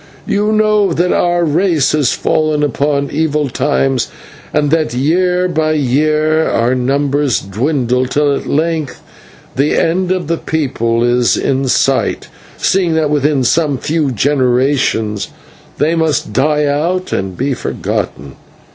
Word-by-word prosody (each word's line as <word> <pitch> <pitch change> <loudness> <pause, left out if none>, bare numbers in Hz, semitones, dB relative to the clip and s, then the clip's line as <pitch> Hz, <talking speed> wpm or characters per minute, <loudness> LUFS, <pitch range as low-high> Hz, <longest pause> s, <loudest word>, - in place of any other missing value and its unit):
You 210 +1 0
know 215 -3 +2
that 175 +3 +1
our 175 0 +1
race 160 -1 +1
has 145 -5 +1
fallen 155 -1 0
upon 140 -1 -1
evil 150 -2 0
times, 135 -1 0 0.4
and 145 -1 0
that, 155 -6 0
year 180 +6 +1
by 155 -3 0
year, 155 +3 +1
our 115 +2 +1
numbers 140 +1 0
dwindle, 125 +4 -1
till 145 +1 +1
at - - -6
length 160 -1 -1 0.6
the 140 +3 +1
end 180 +2 +1
of 185 -2 -1
the 165 +2 -1
people 120 -7 -1
is 120 0 +2
in 135 0 0
sight, 135 +1 0 0.3
seeing 180 -4 +1
that 155 -2 +1
within 145 -2 +1
some 150 +1 +1
few 155 +2 -1
generations 125 -5 0 0.5
they 155 +3 +1
must 160 -9 -1
die 150 +4 +1
out 170 +6 -1
and 95 -1 -3
be 135 +2 -1
forgotten. 70 - -4
145 Hz, 135 wpm, -14 LUFS, 130-160 Hz, 0.6 s, know